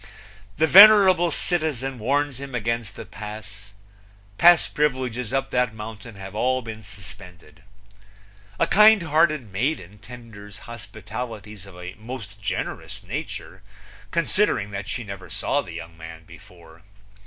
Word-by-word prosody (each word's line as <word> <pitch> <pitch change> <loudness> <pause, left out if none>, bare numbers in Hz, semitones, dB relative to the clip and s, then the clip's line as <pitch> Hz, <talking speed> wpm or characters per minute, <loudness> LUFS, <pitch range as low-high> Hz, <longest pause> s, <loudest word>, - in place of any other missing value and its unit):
The 160 - +4
venerable 190 -1 +8
citizen 140 -8 -1
warns 140 +3 0
him 135 -2 -7
against 115 -2 -2
the - - -8
Pass; 105 -1 -10 0.7
pass 175 -1 +7
privileges 125 -5 -1
up 135 0 -1
that 125 -3 0
mountain 110 0 -9
have 95 0 -9
all 130 +4 0
been 110 -1 -8
suspended. 90 -5 -12 1.0
A - - +4
kind 210 -2 +6
hearted 155 - +1
maiden 105 - -2
tenders 105 -3 -12
hospitalities 110 -2 -8
of 90 -2 -13
a 90 +1 -8
most 110 -3 -9
generous - - -4
nature, - - -7 0.5
considering 170 - +1
that 100 0 -6
she 115 +1 -4
never 100 -3 -9
saw 145 - 0
the 90 -11 -10
young 85 0 -9
man 80 0 -11
before. 85 0 -16
110 Hz, 130 wpm, -23 LUFS, 100-135 Hz, 1.0 s, venerable